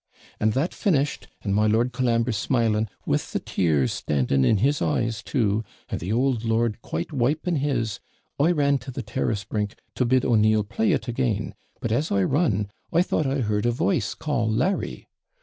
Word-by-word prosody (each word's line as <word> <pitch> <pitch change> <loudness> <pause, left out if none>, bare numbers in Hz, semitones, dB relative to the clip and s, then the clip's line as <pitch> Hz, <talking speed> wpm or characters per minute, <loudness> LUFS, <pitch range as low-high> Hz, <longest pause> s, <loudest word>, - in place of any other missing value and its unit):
And 110 0 +2
that 140 +8 0
finished, 150 -8 0 0.2
and 100 - -1
my 105 +2 +3
Lord 115 +3 +2
Colambre 120 -2 +1
smiling, 110 -1 +1 0.2
with - - -1
the - - +1
tears 75 -8 +1
standing 70 -2 +1
in 105 - +4
his 140 +8 +1
eyes 110 +7 0
too, 110 -5 0 0.3
and - - -3
the 90 +5 -4
OULD 125 0 +1
lord 115 -1 0
quite 85 - -4
wiping 150 +6 +1
his, 125 -7 -1 0.4
I 155 +5 +4
ran 140 -4 +2
to 125 +3 -10
the 130 0 -5
TIRrass 105 -2 -2
brink 105 0 -3 0.2
to - - 0
bid 130 +1 +2
O'Neill 110 -2 +4
play 190 - 0
it 140 - -1
again; 120 -4 -1 0.3
but 115 - -2
as 140 +8 0
I 100 -1 +3
run, 105 - +1 0.2
I 170 +2 +4
thought 155 -5 0
I 135 0 0
heard 105 0 0
a - - +3
voice 125 - 0
call 130 -8 -1
Larry. 180 - -1
115 Hz, 185 wpm, -25 LUFS, 105-135 Hz, 0.4 s, in